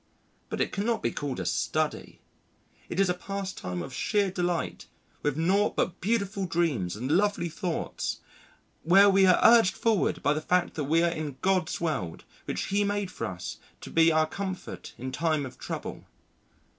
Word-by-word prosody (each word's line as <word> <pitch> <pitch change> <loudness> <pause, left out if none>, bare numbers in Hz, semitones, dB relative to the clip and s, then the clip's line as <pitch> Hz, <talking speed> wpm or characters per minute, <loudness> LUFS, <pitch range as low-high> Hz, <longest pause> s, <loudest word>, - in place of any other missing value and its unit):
But - - -4
it - - 0
cannot 225 +3 -1
be - - +1
called 140 -7 -4
a 90 - -3
study. - - -1 0.7
It 175 - -3
is 195 - +4
a 180 - +2
pastime 185 - -5
of 130 - -8
sheer 200 - +1
delight, 175 -2 -2 0.3
with 145 -1 -1
naught 190 +6 +2
but 180 0 -1
beautiful 200 -2 0
dreams 145 - 0
and 125 +6 -3
lovely 195 -1 +2
thoughts, 170 +1 -3 0.6
where 195 +5 +6
we 190 0 +5
are 180 - +6
urged 225 -4 +6
forward 225 -5 +1
by 145 - +3
the 155 - -2
fact 180 +2 +1
that 150 - -3
we 165 +4 +3
are 170 - +3
in 155 -5 -5
God's 185 -3 +1
world 135 - -2 0.2
which - - -2
He 200 +1 +1
made 205 -2 -1
for 115 - -4
us 90 -3 -6 0.2
to - - -9
be 165 0 +5
our 155 0 +3
comfort 190 +3 -6
in 130 +2 -5
time 155 -1 0
of 130 - -10
trouble.... - - -6
175 Hz, 175 wpm, -28 LUFS, 150-195 Hz, 0.7 s, where